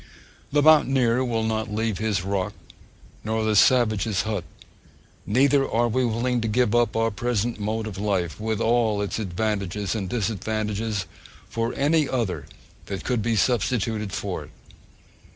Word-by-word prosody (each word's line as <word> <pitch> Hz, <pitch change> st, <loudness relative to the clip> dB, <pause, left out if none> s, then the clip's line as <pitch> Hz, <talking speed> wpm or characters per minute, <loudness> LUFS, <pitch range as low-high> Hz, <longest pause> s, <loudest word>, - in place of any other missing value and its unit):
The 145 Hz, 0 st, +3 dB
mountaineer 130 Hz, -5 st, +4 dB
will 115 Hz, -3 st, -1 dB
not 110 Hz, -1 st, -1 dB
leave 110 Hz, -2 st, -1 dB
his 105 Hz, -4 st, 0 dB
rock, 100 Hz, +1 st, -2 dB, 0.7 s
nor 110 Hz, +1 st, -1 dB
the 110 Hz, -1 st, +1 dB
savage 110 Hz, -2 st, +4 dB
his 105 Hz, -4 st, 0 dB
hut; 105 Hz, -5 st, -2 dB, 0.8 s
neither 135 Hz, +4 st, +3 dB
are 120 Hz, +1 st, +2 dB
we 130 Hz, +3 st, +1 dB
willing 120 Hz, +1 st, 0 dB
to 115 Hz, -, -1 dB
give 115 Hz, 0 st, +2 dB
up 120 Hz, 0 st, +2 dB
our 115 Hz, 0 st, +1 dB
present 120 Hz, +1 st, -1 dB
mode 110 Hz, +2 st, -2 dB
of 100 Hz, -3 st, -6 dB
life, 95 Hz, -7 st, -1 dB
with 110 Hz, 0 st, -2 dB
all 115 Hz, -3 st, +2 dB
its 100 Hz, -, -3 dB
advantages 100 Hz, -1 st, -2 dB
and 100 Hz, -5 st, -3 dB
disadvantages, 110 Hz, -1 st, -2 dB, 0.4 s
for 115 Hz, 0 st, -1 dB
any 150 Hz, +1 st, +2 dB
other 95 Hz, -, -2 dB, 0.4 s
that 100 Hz, -1 st, -5 dB
could 125 Hz, -3 st, 0 dB
be 115 Hz, +1 st, 0 dB
substituted 110 Hz, -2 st, 0 dB
for -, -, -4 dB
it. -, -, -18 dB
110 Hz, 150 wpm, -24 LUFS, 105-120 Hz, 0.8 s, mountaineer